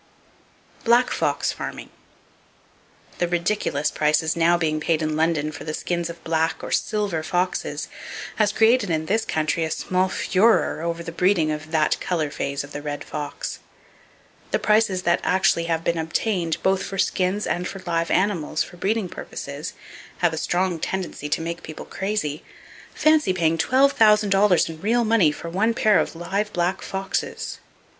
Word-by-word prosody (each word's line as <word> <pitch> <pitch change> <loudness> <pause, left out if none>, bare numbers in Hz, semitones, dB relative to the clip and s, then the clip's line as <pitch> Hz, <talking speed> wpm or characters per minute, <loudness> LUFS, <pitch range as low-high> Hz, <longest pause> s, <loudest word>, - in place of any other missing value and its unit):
Black 240 +2 +4
Fox - - 0
Farming. - - -7 1.3
—The 175 - +2
ridiculous 170 -4 0
prices 155 +1 +1
now 170 +1 +4
being 155 -2 0
paid 160 +1 0
in 155 0 -1
London 155 -1 +1
for - - -8
the 155 -1 -3
skins 170 -1 -2
of 170 0 -9
black 160 0 0
or - - -5
"silver" 205 -6 0
foxes 180 +3 -2 0.5
has 210 -2 +3
created 225 -1 +3
in 160 -1 0
this 220 +6 0
country 155 +2 0
a 160 - -1
small 185 +3 0
furore 195 -2 +2
over 170 0 -3
the 165 - -6
breeding 175 -2 +2
of 155 +1 -5
that 160 -2 +1
color 160 -5 -1
phase 140 -1 -3
of 140 - -11
the 145 - -6
red 145 0 -4
fox. 150 -1 -5 0.9
The - - +1
prices 210 -4 +2
that 175 0 +3
actually 180 -2 +2
have 165 -1 -1
been 170 0 0
obtained, 165 +1 -1
both 190 0 +2
for 195 - -5
skins 190 +2 +1
and 180 +1 -1
for 195 -1 -8
live 165 -1 0
animals 185 -5 +1
for 175 - -12
breeding 205 +2 0
purposes, - - -7 0.4
have 175 -2 +2
a - - -3
strong 175 +1 0
tendency 180 -5 -4
to 155 - 0
make 170 +1 -4
people 155 - -8
crazy. 190 -7 -3 0.5
Fancy 310 -11 +3
paying 165 -3 +2
$12,000 210 -5 +4
in 160 -1 -8
real 235 +4 +2
money 215 -8 +4
for 170 - -8
one 215 +7 +1
pair 215 -7 +4
of 160 - -2
live 195 +5 -2
black 175 +2 0
foxes! 195 0 -3
175 Hz, 165 wpm, -23 LUFS, 160-200 Hz, 1.3 s, Black